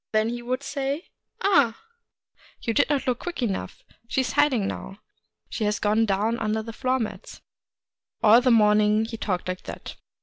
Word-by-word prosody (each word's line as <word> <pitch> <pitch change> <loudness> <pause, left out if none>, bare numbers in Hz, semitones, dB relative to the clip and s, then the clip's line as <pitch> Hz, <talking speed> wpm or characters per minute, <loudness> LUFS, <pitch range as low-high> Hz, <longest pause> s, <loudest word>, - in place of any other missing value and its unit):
Then 215 +1 +2
he 240 0 -4
would 255 +3 -3
say, 280 +3 -3 0.2
' - - -41
Ah! 285 - +3 0.8
you 230 - -2
did 285 - +3
not 285 -3 0
look 250 -2 0
quick 345 -7 -4
enough: 200 -5 -3 0.2
she 265 - +1
is 255 - -2
hiding 245 -9 +2
now; 195 - -6 0.3
— - - -50
she 220 - -3
has 210 0 +1
gone 215 +2 +2
down 210 +4 0
under 220 0 -1
the 225 0 -8
floor 255 +2 0
mats.' 225 -4 -6 0.8
All 225 +3 +7
the 255 - +2
morning 210 -1 +4
he 225 - -6
talked 185 -4 -2
like 185 0 -3
that. - - -8
230 Hz, 190 wpm, -25 LUFS, 210-260 Hz, 0.8 s, All